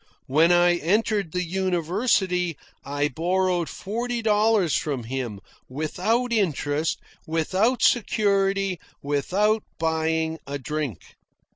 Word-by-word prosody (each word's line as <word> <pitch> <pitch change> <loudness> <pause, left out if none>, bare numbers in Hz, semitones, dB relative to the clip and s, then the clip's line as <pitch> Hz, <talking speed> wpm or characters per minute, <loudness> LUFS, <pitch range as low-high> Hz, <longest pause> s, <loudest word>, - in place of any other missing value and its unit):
When 155 +6 +4
I 175 0 +4
entered 200 +1 0
the 180 +1 -1
university, 180 - 0 0.3
I 145 +1 -1
borrowed 175 +3 0
forty 235 +3 -3
dollars 210 -5 +3
from 140 -5 -2
him, 120 -4 -4 0.3
without 190 - -1
interest, 155 - 0 0.3
without 185 +10 +1
security, 195 -5 +2 0.2
without 190 +10 +1 0.2
buying 160 0 0
a 140 +1 -3
drink. 140 - -4
175 Hz, 100 wpm, -24 LUFS, 155-200 Hz, 0.3 s, When